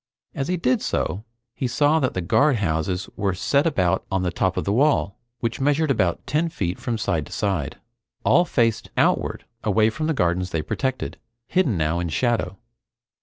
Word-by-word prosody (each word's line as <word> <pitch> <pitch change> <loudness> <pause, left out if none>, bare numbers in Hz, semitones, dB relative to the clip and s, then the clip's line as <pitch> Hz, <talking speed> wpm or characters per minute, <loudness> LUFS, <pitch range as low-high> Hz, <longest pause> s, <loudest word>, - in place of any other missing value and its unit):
As 135 - -3
he 180 - 0
did 130 -6 +1
so 95 +7 -2 0.3
he 130 - -2
saw 145 +5 +3
that 130 -4 -1
the 95 - -1
guardhouses 95 - +1
were 100 -3 -1
set 140 - +2
about 95 - +1
on 95 -1 0
the 90 - 0
top 95 +2 0
of - - 0
the 100 - 0
wall, 130 -5 +2 0.2
which 115 +2 -2
measured 145 +2 +2
about 90 -9 0
ten 160 +3 0
feet 90 - -3
from 115 -2 -2
side 85 -7 -1
to - - -15
side. 90 -8 -2 0.5
All 175 - +5
faced 115 -10 0
outward - - +1 0.2
away 110 +1 +3
from 155 +6 -3
the 160 - 0
gardens 90 -2 +1
they 80 -2 -2
protected, 130 - -3 0.3
hidden 135 - +1
now 80 +2 0
in 85 -1 -2
shadow. 100 0 0
110 Hz, 180 wpm, -23 LUFS, 90-140 Hz, 0.5 s, All